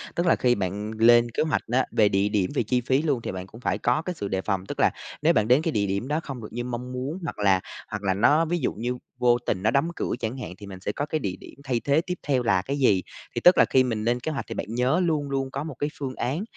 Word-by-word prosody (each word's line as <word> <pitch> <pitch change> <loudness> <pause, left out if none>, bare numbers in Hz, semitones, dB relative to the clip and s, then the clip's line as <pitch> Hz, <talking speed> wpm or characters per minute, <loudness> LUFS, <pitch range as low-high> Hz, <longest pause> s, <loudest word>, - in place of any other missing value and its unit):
Tức 170 - 0
là 165 - +5
khi 125 -1 +2
bạn 100 +2 -3
lên 120 +1 +5
kế - - 0
hoạch 155 -2 0
á, 130 +1 +3
về 105 -2 +4
địa 100 +1 +1
điểm 100 -4 +1
về - - +2
chi 125 +3 +1
phí 130 +3 +1
luôn 145 -6 0
thì - - -4
bạn 95 0 -6
cũng 115 +5 -14
phải 100 -3 0
có 120 +7 +1
cái 180 +2 -4
sự 100 - -4
đề 95 -1 -1
phòng, 95 -1 -2
tức - - -7
là - - +4 0.3
nếu - - +4
bạn 105 0 +2
đến 125 +5 +5
cái 165 - -1
địa 105 -7 +1
điểm 100 +6 -2
đó 150 +2 0
không 135 -5 -7
được 105 - -8
như 120 +1 -3
mong 125 +1 -5
muốn 130 +6 -4
hoặc 165 - -5
là 100 -2 +4 0.3
hoặc 105 -1 -4
là 95 -1 +2
nó 145 - +4
ví 175 +2 0
dụ - - -1
như 120 +3 -3 0.2
vô 120 -1 +5
tình 95 -2 -1
nó 110 - +3
đóng 140 +6 +2
cửa - - -2
chẳng 115 +4 -3
hạn, 125 - -6
thì 105 - -10
mình 95 -2 -9
sẽ 95 - -3
có 145 - -3
cái 155 +1 -2
địa 95 -9 -3
điểm - - -12
thay 130 -4 0
thế 145 +5 +2
tiếp 180 +1 -4
theo 130 -4 +2
là 95 -6 +3
cái 140 +8 -3
gì. 105 -9 +3 0.3
Thì - - -1
tức 180 - +7
là - - +7
khi 130 - +5
mình 115 -4 -2
lên 120 +2 +1
kế 155 +6 -3
hoạch 140 - -4
thì - - -6
bạn - - -3
nhớ 130 +8 +2
luôn 150 -4 0
luôn 135 -1 -2
có 140 +2 -3
một 155 -3 -6
cái 145 - 0
phương 130 -2 -4
án 145 +10 -2
125 Hz, 310 wpm, -25 LUFS, 105-140 Hz, 0.3 s, tức